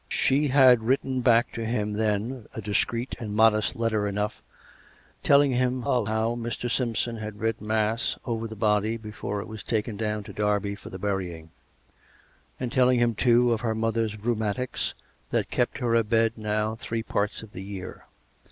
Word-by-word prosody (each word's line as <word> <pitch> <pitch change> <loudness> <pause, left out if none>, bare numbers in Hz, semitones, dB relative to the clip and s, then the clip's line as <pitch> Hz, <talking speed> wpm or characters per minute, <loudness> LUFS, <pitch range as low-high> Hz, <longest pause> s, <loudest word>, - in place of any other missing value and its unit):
She 145 +3 +2
had 130 -3 +6
written 130 +2 0
back 120 -1 +4
to 115 - -4
him 105 -2 -1
then, 110 +3 -1
a - - -4
discreet 115 +4 -1
and 105 -4 -5
modest 110 -1 +4
letter 110 -3 0
enough, 105 +1 -2 0.8
telling 140 -1 +5
him 125 0 0
of 120 -3 +1
how 110 +2 0
Mr. 120 0 -3
Simpson 120 -2 -1
had 105 -1 -7
read 115 +1 -1
mass 110 +2 0
over 115 -2 -2
the 110 - -8
body 105 +1 +1
before 105 -2 -5
it - - -8
was 110 -1 -8
taken 110 -2 -2
down 105 -1 -2
to - - -10
Derby 105 -1 0
for 100 - -10
the 95 - -7
burying; 90 -5 -3 1.1
and 125 -2 -3
telling 125 -1 +4
him, 120 -1 +3
too, 120 +2 +4
of 115 -1 0
her 110 -2 -1
mother's 110 -1 -1
rheumatics 110 +2 -2 0.3
that - - -1
kept - - 0
her 120 -2 0
abed 115 0 +3
now 110 0 -1
three 115 -1 -3
parts 105 +1 -2
of 110 - -12
the 90 - -7
year. 95 -1 -8
110 Hz, 170 wpm, -26 LUFS, 105-120 Hz, 1.1 s, had